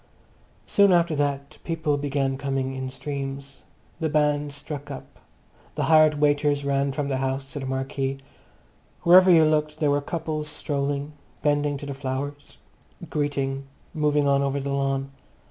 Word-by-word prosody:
Soon 200 -1 +4
after 170 -2 +3
that 140 0 -2
people 160 -3 0
began 140 -1 -1
coming 135 -1 -2
in 130 0 -4
streams. 140 0 -6 0.4
The 160 -2 0
band 150 -1 +1
struck 145 0 -7
up; 135 - -9 0.6
the - - -1
hired 155 -1 +5
waiters 145 -1 +2
ran 140 0 +1
from 140 +1 -2
the 135 -2 -1
house 135 +1 -3
to 145 - -4
the 135 - -5
marquee. 135 +1 -2 0.9
Wherever 185 +2 +8
you 165 -3 +7
looked 150 0 +1
there 150 -2 +2
were 145 0 +2
couples 155 0 -3
strolling, 145 0 -2 0.3
bending 145 -1 +1
to 145 - -8
the 140 - -4
flowers, 140 +1 -5 0.5
greeting, 140 -2 -1 0.3
moving 150 -2 +2
on 140 0 +3
over 140 0 0
the 140 0 -3
lawn. 135 0 -1
145 Hz, 150 wpm, -25 LUFS, 135-150 Hz, 0.9 s, Wherever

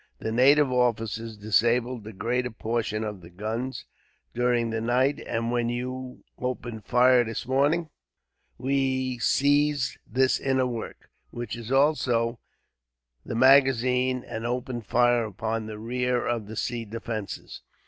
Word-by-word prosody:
The 110 - -4
native 135 +4 +5
officers 115 -2 0
disabled 115 +3 +1
the 110 - -8
greater 125 +5 -1
portion 110 -1 -2
of 105 -3 -5
the 85 - -13
guns, 110 +8 -4 0.5
during 120 -1 +1
the 115 0 -2
night; 125 +4 +2
and 115 +1 -1
when 120 -1 0
you 125 +1 -5 0.2
opened 120 -4 -4
fire 125 +2 +5
this 115 -1 -5
morning 145 +6 +2 0.7
we 130 -1 0
seized 145 +1 +2
this 130 +3 +2
inner 130 -1 +1
work, 120 -3 -6 0.2
which 120 0 -5
is 115 +1 -8
also 125 -5 +2 0.8
the - - -5
magazine, 130 -1 +4
and 110 - -5
opened 120 -2 -3
fire 120 0 +3
upon 110 +1 -3
the 110 -1 -7
rear 125 +2 -1
of 115 -3 -2
the 110 - -8
sea 120 +1 -2
defences. 110 -1 -6
120 Hz, 135 wpm, -26 LUFS, 115-130 Hz, 0.8 s, native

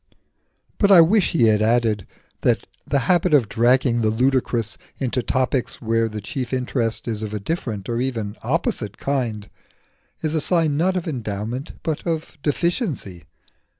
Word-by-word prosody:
But 200 -1 +4
I 190 - +9
wish 190 +4 +4
he 160 - +3
had 110 -2 +4
added 110 -3 +2 0.3
that - - +2 0.2
the 140 - +2
habit 175 -3 +4
of 125 -7 +3
dragging 120 +2 +3
the 110 - +2
ludicrous 120 -1 +1 0.2
into 125 -1 -1
topics 130 0 -1
where 115 0 +1
the 105 -1 -6
chief 125 +4 -4
interest 125 -3 -1
is 110 -2 -2
of 105 -1 -4
a - - -2
different 110 - -3
or 120 0 -1
even 115 -6 -3
opposite - - -1
kind 120 -7 -2 0.7
is 155 -1 -1
a 160 - +1
sign 165 -3 +1
not 185 +5 +1
of 175 - -3
endowment, 120 -1 -4
but 155 -2 -2
of 160 -1 -3
deficiency. 150 - -2
125 Hz, 155 wpm, -22 LUFS, 110-155 Hz, 0.7 s, I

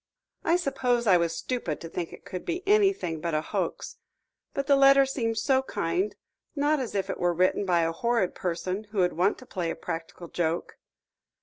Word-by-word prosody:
"I 335 - +3
suppose 265 -7 0
I 190 -4 +6
was 170 -1 0
stupid 240 - -3
to 165 - -6
think 170 0 -4
it - - -13
could 185 - -6
be 360 +3 -4
anything 390 - +2
but 170 -1 -1
a 155 - +1
hoax. - - -3 0.5
But 275 - -2
the 280 0 +5
letter 275 0 +7
seemed 230 -4 -2
so 265 +3 +3
kind, 365 +8 -1 0.4
not 295 +1 +2
as 245 -5 -4
if 195 - 0
it - - -4
were 175 -1 +1
written 185 +3 +2
by 175 -2 +3
a 165 0 +1
horrid 230 +1 0
person 185 +4 -3
who 210 0 -10
would 180 -2 +3
want 185 +5 +2
to 255 - -13
play 175 -7 -3
a - - -2
practical 165 0 -6
joke." 165 0 -2
205 Hz, 200 wpm, -27 LUFS, 175-275 Hz, 0.5 s, letter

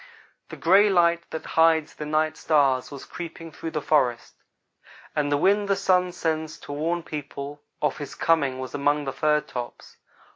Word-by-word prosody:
"The - - -8
gray 195 +5 +5
light 170 -2 +2
that 160 - -6
hides 160 -1 +3
the 150 - -7
night 155 +1 +1
stars 140 -5 +2
was 140 -2 -9
creeping 165 -1 -8
through 165 - -6
the 155 -2 -4
forests, 125 -6 +1 0.8
and 145 -1 0
the 145 - +3
wind 200 +6 +2
the 195 - +2
Sun 185 -2 +2
sends 160 -2 -2
to - - -9
warn 165 +4 -1
the - - -24
people 145 -1 -7 0.2
of 150 0 0
his 145 - -7
coming 145 -6 +1
was 130 0 -6
among 145 +1 +1
the 135 - -3
fir 150 +2 +2
tops. 120 -4 -8
155 Hz, 180 wpm, -25 LUFS, 145-170 Hz, 0.8 s, gray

